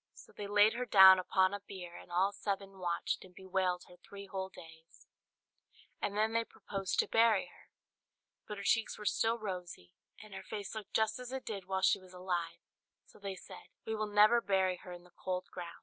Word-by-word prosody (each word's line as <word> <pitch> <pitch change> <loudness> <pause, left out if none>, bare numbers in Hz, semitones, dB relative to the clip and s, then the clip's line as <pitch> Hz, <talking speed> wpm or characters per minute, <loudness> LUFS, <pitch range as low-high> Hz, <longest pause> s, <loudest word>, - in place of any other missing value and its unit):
So - - -15
they 205 - -7
laid 205 +1 +5
her 250 +1 -3
down 190 -3 +9
upon 185 +1 +2
a 205 - -3
bier, 185 -3 -9
and - - -12
all 185 +3 +2
seven 195 -1 -4
watched 175 -1 -2
and 185 -1 -16
bewailed 185 -2 -1
her 180 - -16
three 200 +1 -11
whole 190 -1 -4
days; 160 -2 -15 1.0
and 205 - -2
then 220 +1 +2
they 230 0 +2
proposed 195 -4 -4
to - - -5
bury 225 -3 +4
her; - - -19 0.8
but 210 - -6
her 200 - -6
cheeks 225 +2 +1
were 210 - -9
still 225 +2 +2
rosy, 180 - -6 0.3
and 215 -1 -12
her - - -6
face 205 -2 -6
looked 220 -2 -8
just 220 +1 +2
as 250 0 -7
it 265 0 -5
did 200 -4 -5
while 190 0 -2
she - - +4
was 185 -1 -16
alive; 175 -2 -3 0.4
so - - -19
they 200 -1 -5
said, 180 - -12 0.2
"We 220 - -2
will 215 -1 -1
never 210 +3 +5
bury 190 -3 +1
her 180 - -11
in 175 0 -9
the 180 - -20
cold 185 +1 -4
ground." 175 -2 -7
195 Hz, 210 wpm, -33 LUFS, 180-210 Hz, 1.0 s, down